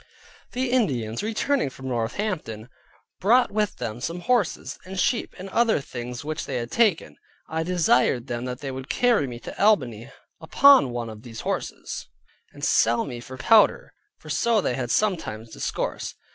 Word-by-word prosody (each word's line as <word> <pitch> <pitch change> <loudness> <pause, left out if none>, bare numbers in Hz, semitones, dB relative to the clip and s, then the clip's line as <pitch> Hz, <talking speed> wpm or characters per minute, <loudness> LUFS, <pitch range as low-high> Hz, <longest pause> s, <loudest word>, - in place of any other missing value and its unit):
The 255 0 -1
Indians 125 - 0
returning 225 - 0
from 130 0 -9
Northampton, 120 - -3 0.5
brought 240 +6 +4
with 210 -1 0
them 110 +2 -5
some 170 +6 -4
horses, 240 -5 0
and 185 +1 -6
sheep, 235 - 0
and 185 - -7
other 230 0 +2
things 125 -1 -7
which 155 +1 -4
they 135 - -3
had 120 -1 -3
taken; 215 -8 +1 0.3
I 160 0 -2
desired 160 -8 +2
them 120 +1 -4
that 125 0 -5
they 135 -2 -4
would 130 +1 -7
carry 240 - +2
me 120 -2 -7
to - - -4
Albany 125 - +2 0.3
upon 265 - +6
one 120 -2 -4
of 110 -1 -11
those 115 -2 -9
horses, - - -4 0.4
and - - -5
sell 115 +1 +3
me 120 -3 -6
for 130 +2 -10
powder: 215 - +4 0.2
for - - -9
so 235 -2 +2
they 155 - 0
had 125 -1 -3
sometimes 115 - -1
discoursed. - - -3
145 Hz, 165 wpm, -25 LUFS, -, 0.5 s, upon